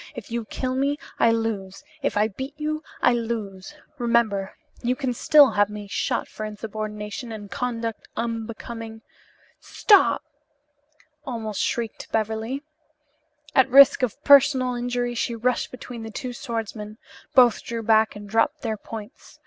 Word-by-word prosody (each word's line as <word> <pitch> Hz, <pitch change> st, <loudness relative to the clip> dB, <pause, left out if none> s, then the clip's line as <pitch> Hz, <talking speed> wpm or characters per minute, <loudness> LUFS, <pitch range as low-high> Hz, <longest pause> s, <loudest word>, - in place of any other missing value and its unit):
If 240 Hz, -3 st, -9 dB
you 235 Hz, -1 st, -2 dB
kill 255 Hz, +4 st, -3 dB
me 280 Hz, +2 st, 0 dB, 0.2 s
I 230 Hz, -, +5 dB
lose, 225 Hz, -1 st, -2 dB, 0.2 s
if 280 Hz, -, -1 dB
I 210 Hz, +1 st, +4 dB
beat 265 Hz, +7 st, -7 dB
you 310 Hz, 0 st, -2 dB, 0.2 s
I 245 Hz, -, +5 dB
lose. 225 Hz, -1 st, -4 dB, 0.2 s
Remember, 230 Hz, -5 st, +1 dB, 0.2 s
you 250 Hz, +1 st, 0 dB
can 255 Hz, -1 st, -2 dB
still 290 Hz, +3 st, +6 dB
have 205 Hz, 0 st, +2 dB
me 210 Hz, 0 st, -7 dB
shot 195 Hz, -, -1 dB
for 215 Hz, -, -8 dB
insubordination 215 Hz, +1 st, -5 dB
and 205 Hz, -3 st, -8 dB
conduct 230 Hz, +1 st, -3 dB
unbecoming 225 Hz, 0 st, -5 dB, 0.3 s
" -, -, -33 dB, 0.2 s
"Stop!" 410 Hz, -3 st, +5 dB, 1.0 s
almost 220 Hz, -6 st, -4 dB
shrieked 230 Hz, -2 st, -3 dB
Beverly. 225 Hz, +5 st, -2 dB, 0.9 s
At 265 Hz, 0 st, +4 dB
risk 275 Hz, +2 st, +8 dB
of 250 Hz, -5 st, -2 dB
personal 270 Hz, -3 st, +6 dB
injury 245 Hz, 0 st, -2 dB
she 235 Hz, 0 st, -2 dB
rushed 245 Hz, +2 st, 0 dB
between 250 Hz, -2 st, -9 dB
the 225 Hz, -, -6 dB
two 245 Hz, +3 st, -5 dB
swordsmen. 225 Hz, -5 st, -5 dB, 0.4 s
Both 245 Hz, -3 st, +6 dB
drew 230 Hz, -1 st, -4 dB
back 220 Hz, 0 st, +3 dB
and 205 Hz, 0 st, -9 dB
dropped 225 Hz, +9 st, +1 dB
their 220 Hz, -2 st, -2 dB
points. 220 Hz, +4 st, -10 dB
230 Hz, 145 wpm, -24 LUFS, 215-250 Hz, 1.0 s, risk